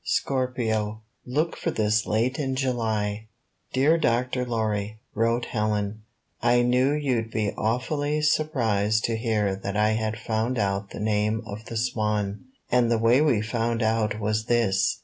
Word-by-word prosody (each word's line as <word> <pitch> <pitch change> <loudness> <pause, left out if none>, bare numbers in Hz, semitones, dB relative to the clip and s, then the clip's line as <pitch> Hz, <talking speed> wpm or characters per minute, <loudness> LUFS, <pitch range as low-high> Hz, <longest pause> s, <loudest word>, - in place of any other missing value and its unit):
SCORPIO 110 -5 -1 0.2
Look 155 +6 0
for - - -2
this 110 -6 +1
late 115 +6 0
in 135 -3 -1
July 110 -5 -1 0.4
"Dear 150 +6 +3
Dr. 125 -2 0
Lorry/' 110 -3 -1 0.2
wrote 115 +2 +1
Helen, 105 -1 -1 0.4
"I 120 0 +4
knew 125 +3 +3
you'd 130 -7 0
be 105 -2 -1
awfully 145 +7 -1
surprised 115 -9 +1
to 115 - 0
hear 110 -4 0
that 100 +1 -4
I 105 0 +3
had 110 0 -1
found 115 +3 -1
out 100 -1 -1
the - - -8
name 105 +1 0
of 105 +1 -8
the 115 - -5
Swan. 105 -3 -1 0.3
And 125 -1 +3
the 115 - +3
way 115 +5 +4
we 125 -9 +3
found 115 +1 -1
out 110 -1 +1
was 110 +1 -1
this. 115 -5 +2
110 Hz, 150 wpm, -25 LUFS, 105-125 Hz, 0.4 s, I